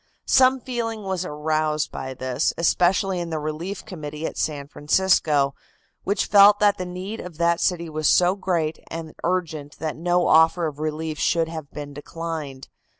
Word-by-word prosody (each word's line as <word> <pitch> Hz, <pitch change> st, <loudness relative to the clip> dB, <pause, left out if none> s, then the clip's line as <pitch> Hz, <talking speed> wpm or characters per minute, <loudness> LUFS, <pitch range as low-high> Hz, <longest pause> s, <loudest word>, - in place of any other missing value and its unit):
Some 260 Hz, 0 st, +5 dB
feeling 230 Hz, -4 st, -3 dB
was 190 Hz, -2 st, -2 dB
aroused 155 Hz, -1 st, -1 dB
by 130 Hz, 0 st, -6 dB
this, 130 Hz, +3 st, -1 dB
especially 180 Hz, +3 st, +2 dB
in 170 Hz, -1 st, -4 dB
the 160 Hz, -, -2 dB
relief 155 Hz, +6 st, -5 dB
committee 155 Hz, -3 st, -6 dB
at -, -, -4 dB
San 145 Hz, -2 st, -2 dB
Francisco, 150 Hz, -3 st, +2 dB, 0.5 s
which 200 Hz, +2 st, 0 dB
felt 205 Hz, 0 st, +7 dB
that 205 Hz, -2 st, +3 dB
the 180 Hz, -, -3 dB
need 185 Hz, +5 st, -6 dB
of 180 Hz, -4 st, -9 dB
that 170 Hz, 0 st, +2 dB
city 170 Hz, -2 st, 0 dB
was 155 Hz, -1 st, -1 dB
so 180 Hz, +1 st, +4 dB
great 170 Hz, -5 st, -1 dB
and 160 Hz, -1 st, -6 dB
urgent 160 Hz, -5 st, -2 dB
that 155 Hz, -1 st, -3 dB
no 175 Hz, +2 st, +1 dB
offer 160 Hz, +2 st, +5 dB
of 150 Hz, -2 st, -5 dB
relief 155 Hz, 0 st, -3 dB
should 165 Hz, -2 st, +1 dB
have 160 Hz, -3 st, -7 dB
been 145 Hz, -1 st, -8 dB
declined. 150 Hz, -2 st, -6 dB
165 Hz, 165 wpm, -23 LUFS, 150-185 Hz, 0.5 s, felt